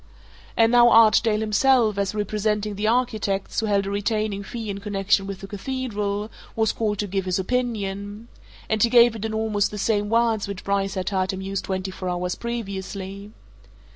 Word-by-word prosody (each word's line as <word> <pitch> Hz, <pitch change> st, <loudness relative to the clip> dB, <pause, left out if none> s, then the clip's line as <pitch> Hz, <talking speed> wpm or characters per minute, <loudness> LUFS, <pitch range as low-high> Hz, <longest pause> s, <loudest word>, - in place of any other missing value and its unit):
And 225 Hz, 0 st, +5 dB
now 240 Hz, 0 st, +7 dB
Archdale 220 Hz, -1 st, +5 dB
himself, 220 Hz, -1 st, +3 dB
as 200 Hz, +1 st, -1 dB
representing 210 Hz, 0 st, -1 dB
the 205 Hz, +2 st, -2 dB
architects 220 Hz, -5 st, 0 dB
who 220 Hz, -, -1 dB
held 200 Hz, -1 st, +1 dB
a 195 Hz, -, -3 dB
retaining 205 Hz, 0 st, -1 dB
fee 225 Hz, +2 st, -6 dB
in 200 Hz, -1 st, -4 dB
connection 200 Hz, -1 st, 0 dB
with 195 Hz, -1 st, -6 dB
the 195 Hz, -, -7 dB
Cathedral, 210 Hz, -2 st, -3 dB, 0.2 s
was 220 Hz, -1 st, +2 dB
called 210 Hz, -2 st, -1 dB
to 205 Hz, -, -1 dB
give 195 Hz, 0 st, -2 dB
his 185 Hz, -1 st, 0 dB
opinion 205 Hz, -1 st, -3 dB, 0.4 s
and 220 Hz, -1 st, 0 dB
he 235 Hz, -, +5 dB
gave 235 Hz, -1 st, +6 dB
it 220 Hz, 0 st, -5 dB
in 220 Hz, -, -3 dB
almost 215 Hz, -2 st, 0 dB
the 210 Hz, -, -7 dB
same 205 Hz, 0 st, 0 dB
words 230 Hz, -2 st, +2 dB
which 200 Hz, -2 st, -6 dB
Bryce 195 Hz, -1 st, -1 dB
had 185 Hz, -1 st, -2 dB
heard 190 Hz, -2 st, 0 dB
him 190 Hz, -, -5 dB
use 195 Hz, 0 st, -3 dB
twenty 190 Hz, 0 st, -3 dB
four 185 Hz, 0 st, -5 dB
hours 180 Hz, 0 st, -2 dB
previously. 200 Hz, -3 st, -6 dB
205 Hz, 185 wpm, -24 LUFS, 195-225 Hz, 0.4 s, now